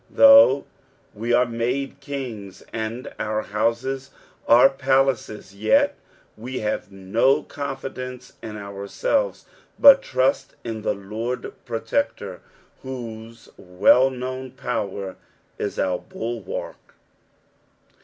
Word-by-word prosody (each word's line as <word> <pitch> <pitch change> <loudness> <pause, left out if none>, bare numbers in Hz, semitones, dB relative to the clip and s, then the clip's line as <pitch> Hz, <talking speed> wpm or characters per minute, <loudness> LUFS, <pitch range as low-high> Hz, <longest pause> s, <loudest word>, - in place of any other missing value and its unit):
Though 275 - +7 0.5
we 115 +3 -3
are 120 +1 +5
made 120 +4 -2
kings, 115 -9 -7
and 115 +3 -4
our 110 0 -1
houses 120 +5 -1 0.4
are 120 +3 +8
palaces, 135 -7 0
jet 110 +2 +3 0.4
we 125 +4 -6
have 105 -1 -3
no 100 +8 +2
con 140 -2 -5
fidence 125 -1 -7
in 110 -2 -7
ourselves, 100 - -2 0.3
but 275 -1 +9
trust 130 +1 0
in 115 -2 -5
the 105 - -1
Lord 110 +5 -5
Protector, 115 - -2 0.4
whose 115 -3 -8
well 95 +8 +4
known 130 0 -5
power 100 -7 -4 0.4
is 100 - -3
our 90 -1 0
bulwark. 115 -3 -6
120 Hz, 105 wpm, -23 LUFS, 105-130 Hz, 0.5 s, but